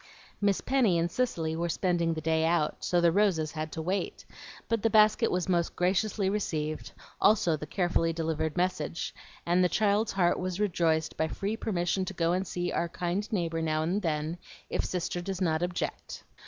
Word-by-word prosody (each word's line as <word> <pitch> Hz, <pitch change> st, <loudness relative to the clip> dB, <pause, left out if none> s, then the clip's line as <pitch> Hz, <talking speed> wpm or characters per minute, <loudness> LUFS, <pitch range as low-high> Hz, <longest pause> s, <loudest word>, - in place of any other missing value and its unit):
Miss 200 Hz, -1 st, +2 dB
Penny 245 Hz, -10 st, +2 dB
and 170 Hz, +1 st, 0 dB
Cicely 165 Hz, -9 st, -1 dB
were 170 Hz, +1 st, -1 dB
spending 170 Hz, -1 st, +1 dB
the 160 Hz, -, -4 dB
day 160 Hz, 0 st, +1 dB
out, 165 Hz, -2 st, +1 dB
so 175 Hz, -, +2 dB
the 170 Hz, -1 st, +4 dB
roses 170 Hz, -5 st, +2 dB
had 155 Hz, -1 st, -4 dB
to 160 Hz, -, -4 dB
wait; 190 Hz, +4 st, -2 dB, 0.4 s
but 230 Hz, -2 st, 0 dB
the 225 Hz, -, +2 dB
basket 215 Hz, +2 st, +5 dB
was 180 Hz, -1 st, -1 dB
most 175 Hz, -2 st, +1 dB
graciously 190 Hz, +3 st, +1 dB
received, 155 Hz, -7 st, -2 dB, 0.3 s
also 195 Hz, -6 st, +4 dB
the 155 Hz, 0 st, -7 dB
carefully 175 Hz, -1 st, +1 dB
delivered 160 Hz, -1 st, -2 dB
message, 175 Hz, -3 st, -1 dB, 0.3 s
and 175 Hz, +2 st, +3 dB
the 180 Hz, -, +3 dB
child's 210 Hz, +3 st, +2 dB
heart 175 Hz, -3 st, +2 dB
was 185 Hz, 0 st, -3 dB
rejoiced 165 Hz, -5 st, +1 dB
by 160 Hz, -, +1 dB
free 200 Hz, +6 st, -3 dB
permission 185 Hz, -3 st, -1 dB
to 195 Hz, -, -6 dB
go 170 Hz, 0 st, +1 dB
and 185 Hz, +1 st, -1 dB
see 175 Hz, 0 st, -2 dB
"our 170 Hz, -, -1 dB
kind 180 Hz, +5 st, -3 dB
neighbor 165 Hz, -5 st, -1 dB
now 155 Hz, -1 st, 0 dB
and 185 Hz, +6 st, 0 dB
then, 160 Hz, 0 st, -2 dB, 0.3 s
if -, -, 0 dB
Sister 180 Hz, -1 st, -2 dB
does 190 Hz, 0 st, -4 dB
not 160 Hz, -4 st, +1 dB
object." 175 Hz, 0 st, -4 dB
175 Hz, 185 wpm, -29 LUFS, 165-195 Hz, 0.4 s, basket